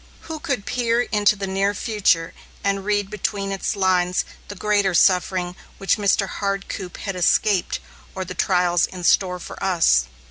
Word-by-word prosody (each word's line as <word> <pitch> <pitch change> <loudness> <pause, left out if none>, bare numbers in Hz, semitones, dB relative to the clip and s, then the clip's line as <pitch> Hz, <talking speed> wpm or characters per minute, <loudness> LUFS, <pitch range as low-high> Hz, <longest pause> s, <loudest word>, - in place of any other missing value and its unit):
Who 320 -1 -7
could 255 -9 -3
peer 240 -1 +1
into 210 -2 +2
the 200 -1 -4
near 195 +1 0
future 195 -7 +1 0.3
and 195 -1 0
read 205 -1 0
between 200 -1 -2
its 195 +2 -2
lines 185 -2 +1 0.2
the 205 - -8
greater 205 -2 +1
suffering 180 -1 +2 0.2
which 195 - +1
Mr. 200 -1 +2
Hardcoop 195 -2 -4
had 195 - -5
escaped, 185 +2 +2 0.4
or 190 -1 -3
the 185 - -6
trials 180 -2 +2
in 180 -1 -9
store 180 +1 +3
for 180 - -9
us? 165 - +3
195 Hz, 155 wpm, -22 LUFS, 180-205 Hz, 0.4 s, store